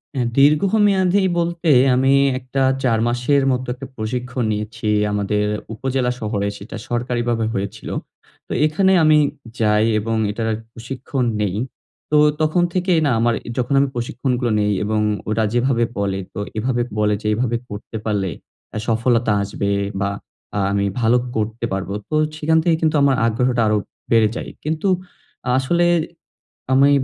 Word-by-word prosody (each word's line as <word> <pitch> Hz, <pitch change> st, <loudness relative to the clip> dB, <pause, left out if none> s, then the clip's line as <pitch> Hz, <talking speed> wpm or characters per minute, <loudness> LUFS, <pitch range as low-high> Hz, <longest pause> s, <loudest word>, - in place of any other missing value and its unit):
অ্যা 125 Hz, -2 st, 0 dB
দীর্ঘমেয়াদী 190 Hz, +5 st, +4 dB, 0.2 s
বলতে 170 Hz, 0 st, -1 dB, 0.3 s
আমি 135 Hz, +2 st, +3 dB, 0.3 s
একটা 130 Hz, +1 st, -3 dB, 0.2 s
৪ 115 Hz, -4 st, +2 dB
মাসের 125 Hz, +4 st, +2 dB
মতো 130 Hz, 0 st, -1 dB
একটা 130 Hz, +1 st, -9 dB
প্রশিক্ষণ 125 Hz, +2 st, -3 dB
নিয়েছি, 105 Hz, +1 st, -3 dB, 0.2 s
আমাদের 105 Hz, 0 st, 0 dB, 0.3 s
উপজেলা 125 Hz, +1 st, -1 dB
শহরে 105 Hz, -2 st, -2 dB
সেটা 100 Hz, -, -9 dB
সরকারিভাবে 120 Hz, -1 st, -1 dB
হয়েছিল। 100 Hz, -1 st, -4 dB, 0.6 s
তো -, -, -12 dB
এখানে 190 Hz, +5 st, +2 dB
আমি 155 Hz, 0 st, +6 dB, 0.4 s
যাই 105 Hz, -1 st, +3 dB
এবং 115 Hz, +2 st, -2 dB, 0.2 s
এটার 110 Hz, +1 st, -2 dB, 0.2 s
প্রশিক্ষণ 125 Hz, +3 st, -4 dB, 0.2 s
নেই। 100 Hz, -2 st, -1 dB, 0.6 s
তো 150 Hz, -, +5 dB, 0.2 s
তখন 155 Hz, +3 st, +2 dB
থেকেই 180 Hz, -2 st, +2 dB
না, 140 Hz, -, +2 dB
আমার 120 Hz, +1 st, +2 dB
এ -, -, -5 dB
যখন 125 Hz, +3 st, 0 dB
আমি 140 Hz, -, +3 dB
প্রশিক্ষণগুলো 125 Hz, 0 st, -1 dB
নেই 105 Hz, 0 st, +1 dB
এবং 110 Hz, +1 st, 0 dB, 0.3 s
ওরা 110 Hz, +1 st, +1 dB
যেভাবে 120 Hz, 0 st, +2 dB
বলে 100 Hz, -1 st, -1 dB
তো -, -, -5 dB, 0.2 s
এভাবে 120 Hz, +2 st, 0 dB, 0.2 s
বলে 105 Hz, -1 st, +2 dB
যে, 105 Hz, -, -3 dB
এভাবে 120 Hz, +1 st, 0 dB
করতে 105 Hz, +2 st, -7 dB
পারলে 100 Hz, -3 st, 0 dB, 0.5 s
আ -, -, -1 dB
সফলতা 115 Hz, 0 st, +2 dB
আসবে 100 Hz, 0 st, -2 dB, 0.3 s
বা 100 Hz, -, +1 dB, 0.5 s
আ -, -, +1 dB
আমি 100 Hz, 0 st, +1 dB, 0.2 s
ভালো 115 Hz, +2 st, +4 dB, 0.2 s
করতে 110 Hz, +2 st, -2 dB
পারব। 95 Hz, 0 st, -3 dB, 0.2 s
তো 155 Hz, -, -1 dB, 0.2 s
সেখান 160 Hz, +1 st, +2 dB
থেকে 170 Hz, -1 st, +3 dB
কিন্তু 160 Hz, -1 st, +2 dB
আমার 140 Hz, -1 st, +4 dB
আগ্রহটা 120 Hz, +1 st, +1 dB
আরো 105 Hz, -, +2 dB, 0.3 s
বেড়ে 110 Hz, -2 st, +5 dB
যায়। -, -, -5 dB
কিন্তু 160 Hz, +5 st, -1 dB, 0.7 s
আসলে 170 Hz, +6 st, +1 dB, 0.9 s
আমি 135 Hz, +2 st, +5 dB
120 Hz, 150 wpm, -20 LUFS, 110-140 Hz, 0.9 s, আমি